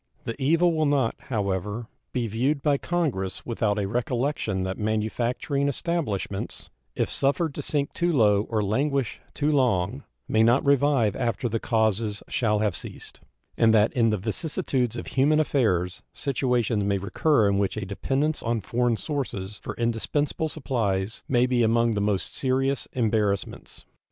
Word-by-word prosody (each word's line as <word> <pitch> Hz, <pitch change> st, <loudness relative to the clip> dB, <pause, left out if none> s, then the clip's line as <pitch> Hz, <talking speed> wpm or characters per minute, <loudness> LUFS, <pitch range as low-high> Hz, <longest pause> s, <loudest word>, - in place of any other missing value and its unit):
The 115 Hz, -, -3 dB
evil 165 Hz, +5 st, +3 dB
will 155 Hz, -1 st, +1 dB
not, 135 Hz, -5 st, +2 dB, 0.2 s
however, 105 Hz, 0 st, -2 dB, 0.3 s
be 125 Hz, -2 st, -1 dB
viewed 130 Hz, +7 st, 0 dB
by 145 Hz, -2 st, +2 dB
Congress 140 Hz, -, -2 dB
without 110 Hz, -3 st, 0 dB
a 100 Hz, -2 st, 0 dB
recollection 120 Hz, -3 st, -1 dB
that 95 Hz, 0 st, -3 dB
manufacturing 115 Hz, +6 st, -1 dB
establishments, 135 Hz, -, -3 dB, 0.2 s
if -, -, +1 dB
suffered 145 Hz, +3 st, 0 dB
to -, -, -5 dB
sink 145 Hz, -1 st, -1 dB
too 175 Hz, 0 st, +1 dB
low 105 Hz, -7 st, +3 dB
or 110 Hz, -2 st, 0 dB
languish 135 Hz, +4 st, 0 dB
too 150 Hz, +1 st, +1 dB
long, 100 Hz, -, +1 dB, 0.2 s
may 110 Hz, -, +2 dB
not 120 Hz, +5 st, +4 dB
revive 140 Hz, -6 st, +3 dB
after 120 Hz, -1 st, -1 dB
the 115 Hz, 0 st, -1 dB
causes 110 Hz, -2 st, 0 dB
shall 105 Hz, -3 st, +1 dB
have 105 Hz, -4 st, 0 dB
ceased, -, -, -8 dB, 0.3 s
and 115 Hz, -1 st, +4 dB
that 105 Hz, +1 st, +4 dB
in 115 Hz, -2 st, +3 dB
the 105 Hz, -, +1 dB
vicissitudes 125 Hz, -, -1 dB
of -, -, -5 dB
human 145 Hz, +3 st, +2 dB
affairs 95 Hz, -, +1 dB
situations 120 Hz, -6 st, 0 dB
may 100 Hz, 0 st, +1 dB
recur 110 Hz, +5 st, +2 dB
in 100 Hz, 0 st, +2 dB
which 100 Hz, +1 st, 0 dB
a 105 Hz, -, -3 dB
dependence 135 Hz, +10 st, -1 dB
on 115 Hz, 0 st, 0 dB
foreign 120 Hz, +3 st, 0 dB
sources 105 Hz, -, -4 dB
for -, -, -6 dB
indispensable 140 Hz, +7 st, -1 dB
supplies 110 Hz, -9 st, -2 dB
may 125 Hz, -1 st, +4 dB
be 125 Hz, -1 st, +1 dB
among 115 Hz, +1 st, +3 dB
the 105 Hz, -2 st, -1 dB
most 100 Hz, -2 st, -1 dB
serious 135 Hz, +1 st, 0 dB
embarrassments. 105 Hz, -4 st, -1 dB
115 Hz, 155 wpm, -25 LUFS, 105-140 Hz, 0.3 s, not